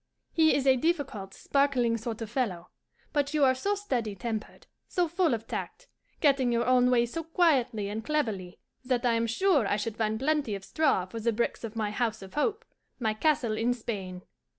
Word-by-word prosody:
He 315 -1 +4
is 275 - 0
a 265 -1 +5
difficult, 270 - -1
sparkling 270 -5 +1
sort 230 0 -4
of 220 - -7
fellow, 200 -9 -2 0.4
but 290 0 0
you 300 - +3
are 260 -1 +6
so 400 +11 -1
steady 245 - -2
tempered, 220 +1 -5 0.2
so 355 -2 +1
full 330 -5 +2
of 225 0 -8
tact, - - -5 0.4
getting 270 -5 +3
your 235 0 +1
own 250 0 +4
way 240 -1 +4
so 330 +8 -5
quietly 270 - +2
and 215 +2 -4
cleverly, 220 -11 -2 0.3
that 250 -1 0
I 240 - +4
am 230 0 +1
sure 290 - +2
I 205 - +1
should 215 +1 -4
find 220 -1 0
plenty 280 -4 0
of 195 0 -8
straw 290 - +1
for 205 +5 -7
the 230 +1 +1
bricks 235 +2 -2
of 225 -1 -6
my 215 -2 -1
house 220 -1 -1
of 190 - -12
hope, 420 - -1 0.3
my 220 -4 0
castle 235 -2 +1
in 240 +3 +1
Spain! 190 -6 -5
240 Hz, 200 wpm, -28 LUFS, 220-285 Hz, 0.4 s, are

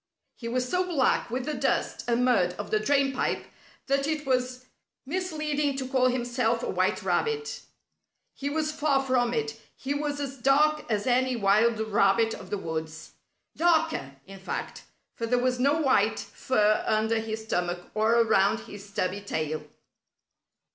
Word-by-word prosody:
He 230 - -8
was 250 +2 -1
so 360 +8 +1
black 295 -9 +1
with 250 +2 -3
the 305 - -2
dust - - -1
and 240 +1 +2
mud 185 -8 +3
of 205 - -6
the 215 - +3
drain 275 +4 +2
pipe 255 - -1 0.4
that 275 0 +1
it 305 -1 -2
was 255 -1 -1 0.4
misleading 300 -3 -1
to 260 -1 -3
call 260 -1 +3
himself 240 -1 0
a - - -2
white - - 0
rabbit. 445 -1 -1 0.7
He 280 - -4
was 305 +1 -1
far 290 -3 +1
from 245 -2 +2
it. 225 -1 -3
He 275 +2 -3
was 290 0 -2
as 275 -1 -4
dark 300 +4 +3
as 205 -1 0
any 255 0 +2
wild 215 +2 +3
rabbit 220 +1 +2
of - - -9
the 205 - -1
woods 160 -3 -5 0.4
darker, 325 - +1
in 195 0 -11
fact, 190 - -5 0.3
for 230 - -4
there 245 +2 +2
was 250 0 0
no 285 +5 +3
white 225 -7 +2
fur 215 -4 +1
under 220 +1 +2
his 220 0 -4
stomach 175 -3 -2
or 220 +2 +3
around 215 -1 +3
his 205 0 -11
stubby 200 -1 -2
tail. 155 -5 -3
245 Hz, 160 wpm, -27 LUFS, 215-280 Hz, 0.7 s, mud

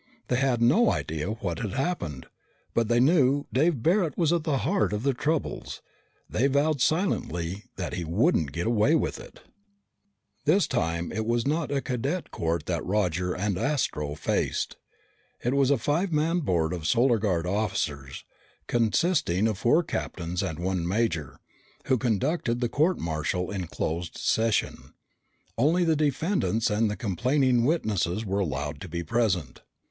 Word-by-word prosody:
They 125 - +2
had 130 -3 +1
no 185 - +5
idea 80 +3 -3
what 95 -6 -3
had 105 -4 -3
happened. 130 - -2 0.5
But 115 -1 +1
they 120 +1 +3
knew 140 0 +3
Dave 140 -2 +2
Barret 170 -4 +2
was 165 -1 +2
at 165 -2 0
the 150 -4 +1
heart 105 -2 +1
of 105 +2 -2
their 140 0 +2
troubles. 150 +5 -2 0.4
They 130 +5 +1
vowed 140 +1 +1
silently 100 - 0
that 90 - -4
he 90 0 -3
wouldn't 85 - +1
get 85 +3 -3
away 115 +7 +3
with - - -1
it! - - -13 1.0
This 175 +6 +4
time 85 0 -1
it 110 0 -3
was 120 +1 +1
not 150 +1 0
a 140 -1 0
cadet 135 +9 -3
court 85 0 -2
that - - -2
Roger 90 -3 0
and 100 0 -1
Astro 85 - -1
faced. - - -1 0.7
It 125 - +1
was 140 -1 +3
a 140 - +4
five 160 - 0
man 160 +3 +1
board 85 - 0
of 80 -4 -3
Solar 120 - +3
Guard 90 -5 0
officers, 90 -9 -2 0.4
consisting 115 - +1
of 105 -3 -2
four 150 +9 +3
captains 90 - -3
and 90 -6 -3
one 90 -1 -1
major, 90 - -1 0.5
who 130 -2 +2
conducted 120 - 0
the 120 -1 0
court 160 +8 +2
martial 85 +3 -2
in 95 -4 -3
closed 85 +2 -3
session. 110 -1 0 0.6
Only 165 +8 +3
the 165 -2 +3
defendants 150 - 0
and 105 +1 +2
the 105 - -2
complaining 125 - +1
witnesses 110 - 0
were 100 0 -1
allowed 75 -4 -3
to 95 - -7
be 85 +1 -3
present. 95 -3 -1
115 Hz, 160 wpm, -27 LUFS, 90-145 Hz, 1.0 s, no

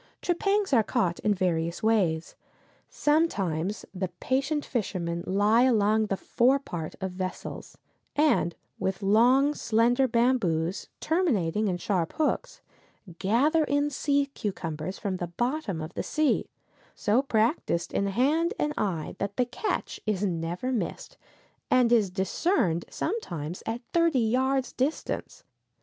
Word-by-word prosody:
Trepangs 395 +1 +1
are 235 - +6
caught 175 -4 0
in 210 - +2
different 170 -1 -1
ways. 185 -8 +1 0.5
Sometimes 205 - 0
the 185 0 -2
patient 275 +3 0
fishermen 170 -7 -2
lie 205 +4 +3
along 220 -3 +3
the 195 - -1
fore 255 +7 +3
part 170 - -6
of 190 -1 -3
vessels, 185 0 -6 0.4
and 290 - +2 0.2
with 190 +2 -2
long 250 +8 +4
slender 240 +2 +2
bamboos, 225 -8 +1
terminating 220 - +1
in 180 -2 0
sharp 175 -3 -1
hooks, - - -1 0.6
gather 275 - +3
in 290 0 +1
sea 285 0 +1
cucumbers 180 -3 -4
from 190 -2 -3
the 175 - -3
bottom 240 - -2
of 160 +3 -6
the - - -3
sea, 305 -1 0 0.5
so 220 +5 +2
practiced 225 - 0
in 200 - +1
hand 300 - +1
and 300 0 0
eye 175 -7 -2
that 200 0 -3
the 250 - +3
catch 245 - -3
is 210 -1 0
never 175 +6 -2
missed, 255 - -3 0.5
and 250 -2 +4
is 220 -5 +4
discerned 190 - 0
sometimes 175 - -4
at 230 +2 -2
thirty 335 -4 +3
yards' 255 +2 +1
distance. 275 +5 -3
220 Hz, 130 wpm, -27 LUFS, 185-275 Hz, 0.6 s, are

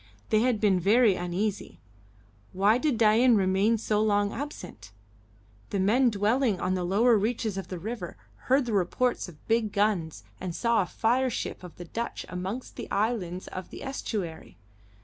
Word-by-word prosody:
They 215 - +3
had 245 -3 +1
been 200 -4 +3
very 215 +4 +4
uneasy. 185 +4 -3 0.7
Why 205 +5 +3
did 290 -4 0
Dain 230 +2 +5
remain 195 +3 +2
so 215 -1 0
long 205 -1 +1
absent? 180 - -7 0.8
The 200 - -2
men 240 +7 +3
dwelling 215 0 +1
on 185 - 0
the 185 -1 -1
lower 215 +5 +3
reaches 220 -1 -1
of 195 - -5
the 185 - -5
river 195 - -6 0.3
heard 265 +1 +3
the 235 - -3
reports 200 +4 0
of 155 -4 -18
big 225 -2 +1
guns 175 - 0 0.2
and 180 -2 -5
saw 235 -2 +2
a 180 - -2
fire 250 +6 +1
ship 235 - -4
of 180 -3 -10
the 175 - -9
Dutch 230 +7 -5
amongst 190 +8 -5
the - - -6
islands 200 -4 -1
of 185 -1 -7
the - - -9
estuary. 195 - -5
210 Hz, 170 wpm, -27 LUFS, 185-235 Hz, 0.8 s, Dain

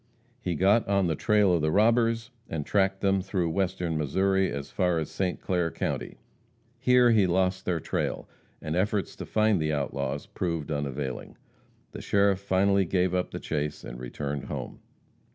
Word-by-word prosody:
He 90 -6 -2
got 100 +7 +3
on 100 -1 +2
the 80 -2 0
trail 105 0 +3
of 85 - +2
the 75 - +1
robbers, 115 +3 +2 0.2
and 75 -3 -3
tracked 95 -1 +1
them 95 -1 +2
through 90 -3 -1
western 85 -3 -1
Missouri 95 +6 +1
as 70 0 -5
far 90 -3 +1
as 80 -2 -3
St. 90 -2 -2
Clair 90 -2 0
county. - - -4 0.6
Here 125 -1 +5
he 105 -4 +4
lost 95 +1 +1
their 85 -2 0
trail, - - -3 0.4
and 80 +1 -2
efforts 100 +2 0
to - - -7
find 110 -4 +2
the 75 0 0
outlaws 70 -1 -2
proved 85 -4 -3
unavailing. 70 -3 -4 0.5
The - - -8
sheriff 100 -1 +2
finally 100 0 +2
gave 90 +1 +1
up 90 0 0
the - - -6
chase 75 -1 -3
and - - -8
returned 70 +3 -4
home. - - -6
90 Hz, 170 wpm, -27 LUFS, 75-100 Hz, 0.6 s, Here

